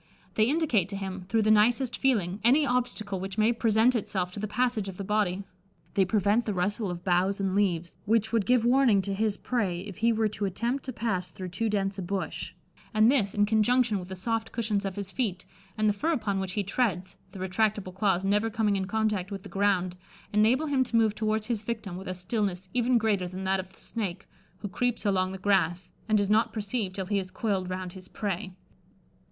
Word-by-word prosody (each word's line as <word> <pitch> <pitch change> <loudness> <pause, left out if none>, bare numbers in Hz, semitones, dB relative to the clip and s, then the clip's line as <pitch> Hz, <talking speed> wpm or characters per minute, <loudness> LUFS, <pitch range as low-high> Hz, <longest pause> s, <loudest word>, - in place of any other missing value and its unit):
They 215 +2 +3
indicate 270 - +2
to 200 - -5
him, 190 -1 -5
through 225 -1 +2
the 215 - +4
nicest 235 +4 +3
feeling, 210 -8 +1
any 275 +6 +5
obstacle 235 -6 -1
which 195 +2 -5
may 220 +2 +4
present 230 +2 +3
itself 190 -5 -1
to 205 - -7
the 215 - -2
passage 225 -1 0
of 190 -2 -7
the 200 - -4
body: 200 -2 0 0.5
they 195 - +3
prevent 205 +4 +2
the 210 - -2
rustle 200 +3 0
of 175 0 -5
boughs 185 +2 +2
and 195 -1 0
leaves, 180 -4 +1
which 220 +1 +1
would 225 -4 +2
give 245 -2 +4
warning 240 -6 +4
to 200 - -2
his 210 +1 0
prey 195 -8 -1
if 195 -2 -8
he 230 +2 +3
were 220 -1 +2
to 210 -1 -3
attempt 235 +8 -2
to 260 - -3
pass 215 -6 -2
through 185 -1 -7
too 220 +5 -1
dense 195 -1 -1
a - - -2
bush, 190 +2 -3 0.4
and 215 +3 +6
this, 215 -8 +1
in 205 0 +4
conjunction 220 +1 +2
with 180 - -8
the 190 - -6
soft 225 +4 -2
cushions 210 -3 -1
of 195 -1 -3
his 200 -1 -5
feet, 200 -7 -2 0.3
and 215 0 +2
the 210 - +3
fur 315 +11 0
upon 205 -8 -1
which 190 -1 -3
he 205 - 0
treads 195 -3 -1 0.2
(the 195 - -10
retractable 190 +1 0
claws 190 -1 +1
never 210 +3 +2
coming 215 -2 +1
in 190 -1 -1
contact 215 -3 0
with 195 -2 -6
the - - -9
ground), 185 -3 +1 0.4
enable 225 +8 +3
him 275 -3 +2
to 240 -2 -5
move 220 -2 +4
towards 215 0 -1
his 230 -2 -2
victim 215 -4 -4
with 190 +2 -7
a 185 - -3
stillness 185 -1 -2
even 245 0 +3
greater 210 -5 +1
than 185 +2 -6
that 190 0 +1
of 185 0 -7
the - - -20
snake, 200 -4 -4 0.3
who 205 - -3
creeps 235 +4 -1
along 185 -2 +2
the 190 - -5
grass, 185 -2 +1 0.2
and 215 -1 +4
is 200 - +1
not 215 +3 +3
perceived 210 -2 -3
till 190 - -3
he 200 +1 0
is 185 -1 -5
coiled 190 -3 -1
round 185 -1 -4
his 185 -1 -11
prey." 195 -2 -4
205 Hz, 220 wpm, -28 LUFS, 190-225 Hz, 0.5 s, and